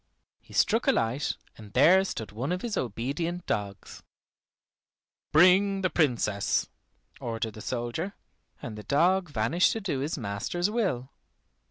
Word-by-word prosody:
He - - -21
struck 225 +3 +2
a - - +7
light, 120 +6 0 0.2
and 105 -2 -12
there 180 +9 +6
stood 110 - -5
one 125 +9 -3
of 180 0 -2
his 235 -3 -2
obedient 140 - -3
dogs. 100 -2 -4 1.3
"Bring 190 +4 +5
the 185 - 0
Princess," 120 - +1 0.5
ordered 115 -1 -3
the 110 - -10
soldier, 125 - -3 0.5
and 115 - -5
the 105 - -7
dog 175 - +2
vanished 145 +8 +2
to 225 - -3
do 185 -10 -2
his 145 +4 -2
master's 125 - -2
will. 160 - -1
140 Hz, 140 wpm, -28 LUFS, 115-180 Hz, 1.3 s, a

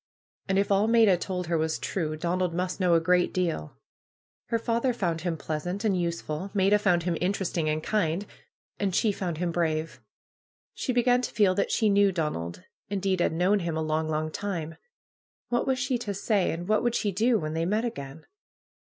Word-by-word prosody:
And 190 0 +1
if 200 +1 +1
all 200 +2 +3
Maida 225 -4 +5
told 180 0 -3
her 165 -1 0
was 160 0 0
true, 155 -5 -2
Donald 175 +1 -1
must 180 +2 -2
know 180 -2 +4
a - - +5
gr^t 180 +2 +2
deal. 165 - -2 0.7
Her 230 - +1
father 235 +2 0
found 170 -6 -1
him 170 -1 -2
pleasant 175 +7 -4
and 205 -3 +2
useful; 170 0 -3
Maida 200 +1 +4
found 180 -4 +2
him 175 -1 0
interesting 180 -4 0
and 155 0 -1
kind; 195 -2 0 0.5
and 195 -3 0
she 220 - +3
found 180 -5 -3
him 175 +1 -1
brave. 160 -2 -1 0.7
She 260 - -2
began 245 0 +3
to 250 - -3
feel 200 -4 +3
that 200 - 0
she 220 - +2
knew 200 -1 +4
Donald; 150 - -3 0.3
indeed, 195 -2 0
had - - +2
known 180 +5 +2
him 170 -3 -2
a 160 - -1
long, 155 0 -1
long 155 0 -1
time 165 -4 -4 0.7
What 240 - 0
was 265 -1 +2
she 255 -1 -1
to 205 -4 -4
say, 200 -1 +1
and 175 +2 -5
what 215 0 +3
would 240 -1 0
she 205 - 0
do, 225 +5 +2
when 155 -5 -3
they 165 +1 -1
met 215 +5 +1
again 150 - -6
180 Hz, 195 wpm, -27 LUFS, 165-205 Hz, 0.7 s, Maida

